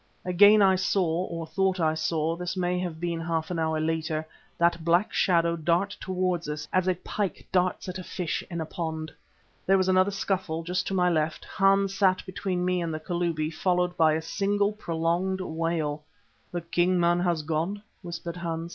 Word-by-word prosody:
Again 205 +4 +6
I 190 -1 +5
saw, 180 -2 +1
or 165 -2 -5
thought 190 +4 0
I 160 -2 +2
saw 160 0 0
this 180 +2 -4
may 180 0 0
have 175 -3 -4
been 170 -1 -2
half 165 0 -2
an 170 - -2
hour 160 -1 0
later 160 0 -1 0.3
that 170 -1 +2
black 175 +5 +2
shadow 170 -2 +3
dart 175 +5 0
towards 180 -3 -1
us, 150 0 -4
as 185 0 +2
a 185 - +2
pike 195 +2 -4
darts 185 0 +1
at 185 0 -5
a - - -6
fish 180 -2 -3
in 170 -2 -4
a 160 - -2
pond. 160 -1 -4 0.6
There 195 +1 +5
was 185 -1 +1
another 185 +1 +4
scuffle, 190 -5 -2
just 180 +2 -2
to 195 - -1
my 180 -1 +3
left 155 -1 -1
Hans 195 0 +2
sat 190 -1 +2
between 185 -1 -2
me 180 -1 +1
and 165 -1 -2
the 155 - -3
Kalubi 165 -2 -1
followed 180 +1 +1
by 160 -2 +4
a 160 +1 -1
single 200 +4 +1
prolonged 175 -1 -1
wail. 160 -4 -2 0.5
"The 175 - -3
king 175 +2 +1
man 175 0 +3
has 175 -3 0
gone," 165 +7 -2 0.2
whispered 170 -1 -6
Hans. 165 -1 -4
175 Hz, 190 wpm, -27 LUFS, 165-185 Hz, 0.6 s, Again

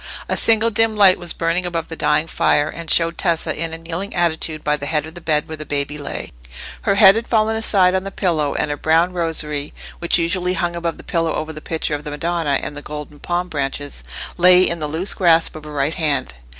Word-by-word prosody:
A - - 0
single 225 0 +4
dim 225 0 +2
light 195 -3 +6
was 175 -2 -4
burning 165 +2 -1
above 170 -2 -3
the 165 - -7
dying 155 - +1
fire, 150 -2 +1
and 165 0 -8
showed 165 +1 +3
Tessa 170 -3 0
in 165 0 -3
a 165 - -5
kneeling 170 +4 -5
attitude 160 -2 -1
by 150 0 +1
the 145 -1 -6
head 150 -1 0
of 160 - -10
the 175 - -11
bed 150 -2 0
where 155 - -7
the 155 - -6
baby 145 0 -2
lay. 145 - -5 0.5
Her 200 - +1
head 195 -1 +7
had 230 +1 -3
fallen 220 -1 +1
aside 195 -4 +3
on 190 0 0
the 195 - -5
pillow, 165 -7 -1
and 150 - -1
her 145 - -3
brown 165 +4 +2
rosary, 155 -4 -3 0.2
which 170 - +3
usually 180 +2 0
hung 175 -2 -2
above 170 -1 -3
the - - -12
pillow 165 -2 -1
over 160 +1 -4
the 155 - -9
picture 160 -1 -3
of 145 0 -3
the 150 - -6
Madonna 150 -1 -1
and 145 - -5
the 145 - -7
golden 150 0 -8
palm 175 +3 -2
branches, 145 -2 -4 0.3
lay 180 +1 +6
in 170 - -2
the 150 - -2
loose 165 +6 0
grasp 165 -4 +3
of 155 -1 -9
her 150 - -9
right 145 +1 0
hand. 145 - -1
165 Hz, 235 wpm, -19 LUFS, 150-180 Hz, 0.5 s, head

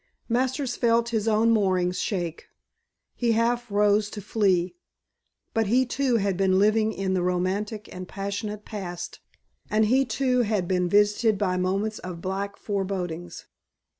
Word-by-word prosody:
Masters 255 +1 0
felt 235 -1 +2
his 225 -2 -1
own 225 +1 +3
moorings 185 -4 +1
shake. 175 -5 -3 0.7
He 235 -2 +1
half 240 +1 +1
rose 205 +1 +3
to 210 - -7
flee. 195 - +1 0.8
But 225 -2 +1
he 250 +5 +3
too 255 0 0
had 200 -3 0
been 190 -1 +3
living 215 +2 +3
in 195 -2 -2
the 185 - +1
romantic 190 +4 -1
and 185 0 -7
passionate 205 +2 -5
past 180 -5 -6 0.5
and 215 +1 +3
he 260 +5 +3
too 250 +2 +1
had 210 -6 0
been 180 -1 +1
visited 210 +2 +3
by 190 -2 0
moments 195 +4 -1
of 180 -2 -7
black 195 +3 -3
forebodings. 180 -4 -4
205 Hz, 145 wpm, -26 LUFS, 185-225 Hz, 0.8 s, own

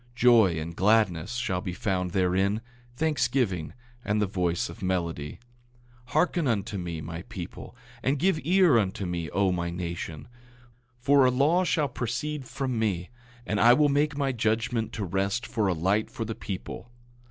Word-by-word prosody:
Joy 115 -8 +5
and 80 +2 -5
gladness 105 0 +2
shall 95 -7 -1
be 90 -2 -4
found 95 -3 -1
therein, 95 +4 +1 0.3
thanksgiving 125 - 0 0.3
and 105 +1 0
the 105 - +2
voice 90 -3 -1
of 115 - -11
melody. 85 -5 -2 0.7
8:4 - - -16
Hearken 170 0 +2
unto 100 -4 -1
me, 85 -3 -4
my 80 +2 -6
people; 90 +6 -8 0.3
and 135 +4 +1
give 175 +2 +2
ear 175 -5 +5
unto 95 -1 -2
me, 85 -3 -3
O 100 -1 +1
my 85 -1 -1
nation; 85 -3 -5 0.7
for 135 +3 +4
a 130 - +5
law 145 +8 +3
shall 155 -4 +1
proceed 135 +4 -3
from 130 -2 -3
me, 95 -3 -1 0.3
and 105 -2 -1
I 120 +1 +7
will 150 +2 +4
make 145 +1 +1
my 140 -2 +1
judgment 115 -1 0
to 105 -3 -3
rest 95 +6 -1
for 110 -4 0
a 95 - +2
light 95 +6 0
for 115 - -5
the 115 - -3
people. 100 +3 -7
105 Hz, 165 wpm, -27 LUFS, 90-125 Hz, 0.7 s, I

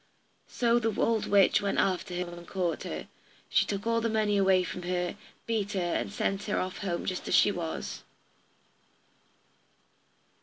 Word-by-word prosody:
So 235 -1 +2
the 225 -2 -1
old 225 -2 +2
witch 200 -2 +5
went 200 -1 -1
after 185 -1 0
her 180 -1 -3
and 175 0 -10
caught 180 -3 -1
her, - - -5 0.4
she - - +3
took 200 0 -3
all 230 0 +2
the 230 - 0
money 215 -2 +1
away 190 -2 +4
from 180 - -5
her, 180 0 -2 0.3
beat 215 -2 -1
her, 195 - 0
and 175 +2 -1
sent 200 0 -1
her 210 - 0
off 185 0 -3
home 175 -4 -2
just 185 -1 -3
as - - +2
she - - +6
was. 160 - -4
195 Hz, 165 wpm, -29 LUFS, 180-210 Hz, 0.4 s, she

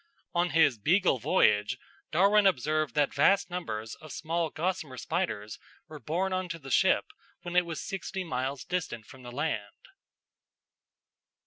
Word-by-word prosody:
On 175 +1 +2
his 150 -7 +4
Beagle 175 - +3
voyage 105 +2 +3 0.3
Darwin 200 +5 +5
observed 155 -4 +1
that 145 -1 +2
vast 190 +7 +3
numbers 110 -11 -4
of 155 -2 -12
small 165 +3 -1
gossamer 160 -5 -3
spiders 110 - -3 0.3
were 155 -1 -9
borne 180 +6 -1
on 185 -1 -2
to 165 - -4
the 135 -4 -10
ship - - +4 0.4
when 175 0 -5
it 180 -1 +4
was 165 -4 -4
sixty 190 0 -4
miles 135 -4 -3
distant 160 -11 -3
from 130 - -14
the 120 -1 -9
land. 120 -7 -4
155 Hz, 145 wpm, -29 LUFS, 130-180 Hz, 0.4 s, Darwin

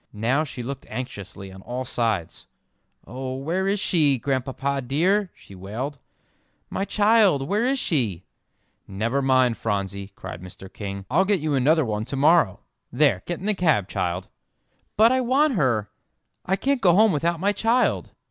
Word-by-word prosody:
Now 120 +8 +1
she 130 -5 -7
looked 135 +2 -6
anxiously 100 -5 -7
on 95 0 -12
all 125 +5 -5
sides. 110 -9 -2 0.6
"Oh, 130 +1 -5
where 170 +8 -1
is 200 +1 +1
she, 155 -8 +3
Grandpapa 135 +2 -2
dear?" 180 +10 +1
she - - -16
wailed, 115 +10 -6 0.7
"my 195 - -2
child; 205 -10 +3
where 210 +7 +1
is 270 +1 +1
she?" 115 - -1 0.6
"Never 115 +8 -1
mind, 130 -3 +3
Phronsie," 100 -2 -3
cried 85 - -8
Mr. 90 +1 -12
King, 100 -2 -6
"I'll 170 +7 +4
get 200 -1 +1
you 155 -1 -1
another 145 +3 +3
one 105 -1 -2
to 135 - -5
morrow. 150 - +3 0.3
There, 145 +3 +2
get 175 - -3
in - - -6
the 215 - +2
cab, 155 - +1
child." 90 -1 -3 0.7
"But 225 +3 +6
I 260 0 +2
want 270 +4 +2
her 125 - 0 0.6
I 190 - +2
can't 275 +4 0
go 175 -2 +5
home 215 +1 +5
without 170 +2 0
my 200 +4 +2
child!" 225 +5 +1
135 Hz, 165 wpm, -24 LUFS, -, 0.7 s, But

